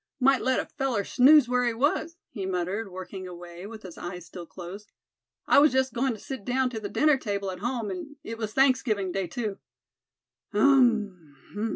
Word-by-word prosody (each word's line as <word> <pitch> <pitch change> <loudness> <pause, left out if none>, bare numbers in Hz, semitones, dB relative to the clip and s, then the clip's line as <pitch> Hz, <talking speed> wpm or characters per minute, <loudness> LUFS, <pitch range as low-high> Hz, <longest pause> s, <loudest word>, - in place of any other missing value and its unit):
"Might 265 0 +4
let 260 0 +1
a - - -2
feller 255 -7 -2
snooze 270 +5 +6
where 250 0 +1
he 240 -2 0
was," 310 +6 0
he 195 -5 -4
muttered, 190 +4 -2
working 185 +1 -7
away, 175 +1 -9
with 220 0 -10
his 185 -3 -10
eyes 175 -1 -6
still 170 +1 -10
closed. 190 +5 -10 0.5
"I - - +6
was 300 +1 +6
just 260 -1 +1
goin' 255 +1 0
to - - -8
sit 265 -2 -7
down 250 +2 0
to 225 - -4
the 205 -2 -5
dinner 300 +4 +3
table 200 -5 -3
at 185 - -8
home, 230 -1 -2
an' 190 +11 -7
it 225 0 -7
was 215 -2 -3
Thanksgiving 250 -7 +2
day 195 0 -2
too. 210 +2 -4 0.9
Um! 210 - +3
220 Hz, 190 wpm, -27 LUFS, 190-260 Hz, 0.9 s, snooze